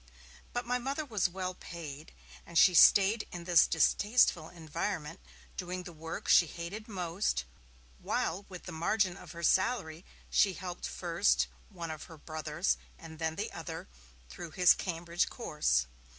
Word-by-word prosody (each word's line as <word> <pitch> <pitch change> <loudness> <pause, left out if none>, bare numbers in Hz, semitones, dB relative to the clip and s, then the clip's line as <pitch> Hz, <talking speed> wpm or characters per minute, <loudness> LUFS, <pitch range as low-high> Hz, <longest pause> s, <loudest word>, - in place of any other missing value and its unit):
But 245 0 -3
my 250 +1 0
Mother 275 +5 -3
was 210 -8 0
well 185 0 -4
paid, 160 -4 -9 0.3
and 170 - -5
she 185 - +7
stayed 200 +5 +6
in 175 -1 -6
this 175 -1 +5
distasteful 175 0 +3
environment, 165 0 -4 0.4
doing 180 0 -4
the 175 - -9
work 160 +1 -7
she 170 - +6
hated 175 +8 -7
most, 180 - -1 0.5
while 180 +5 -1
with 180 -2 -9
the 180 - -7
margin 180 +3 +1
of 180 -4 -11
her 170 0 -8
salary 185 -5 +1 0.3
she 195 - +4
helped 180 -2 -6
first 175 +3 +1 0.2
one 170 -5 -6
of 155 -1 -7
her 165 - -12
brothers 155 +3 -2 0.2
and 160 -1 -11
then 160 -1 -1
the - - -3
other - - -7 0.4
through 170 - -8
his 180 +1 +6
Cambridge 170 -1 -2
course. 150 - 0
175 Hz, 150 wpm, -31 LUFS, 160-195 Hz, 0.5 s, she